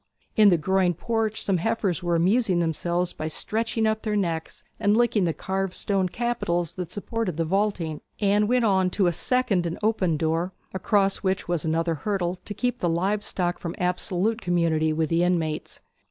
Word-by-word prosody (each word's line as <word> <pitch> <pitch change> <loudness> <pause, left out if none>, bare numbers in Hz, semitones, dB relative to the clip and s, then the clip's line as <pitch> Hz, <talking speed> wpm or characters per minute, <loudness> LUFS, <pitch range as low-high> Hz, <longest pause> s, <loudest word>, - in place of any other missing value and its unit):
In 210 -2 +7
the 175 - +4
groined 180 +1 +1
porch 225 -2 -1
some 195 -2 +1
heifers 195 -2 -1
were 175 -1 0
amusing 190 +3 +2
themselves 175 +1 -1
by 155 - -4
stretching 225 +7 -1
up 220 0 +1
their 215 -1 -1
necks 170 -5 -2 0.2
and 205 0 +3
licking 235 -5 +3
the 165 - +1
carved 190 +1 -3
stone 195 -2 0
capitals 175 -8 -1
that 180 -2 -6
supported 205 -4 -3
the 165 - 0
vaulting. 185 -4 -1 0.2
Anne 205 0 +3
went 245 0 +2
on 190 -3 +3
to 190 +1 +1
a 175 - +2
second 200 -4 +1
and 165 - -4
open 190 -7 +1
door, 165 +4 -1 0.2
across 195 +1 +2
which 190 -1 -1
was 175 -3 0
another 165 +1 0
hurdle 185 -3 -1
to 205 - -5
keep 245 +3 -1
the 175 - 0
live 195 +5 0
stock 175 -4 -2
from 170 - -5
absolute 180 +5 0
community 165 -3 +1
with 155 0 0
the 165 +1 +2
inmates. 165 -3 -1
185 Hz, 185 wpm, -25 LUFS, 170-210 Hz, 0.2 s, In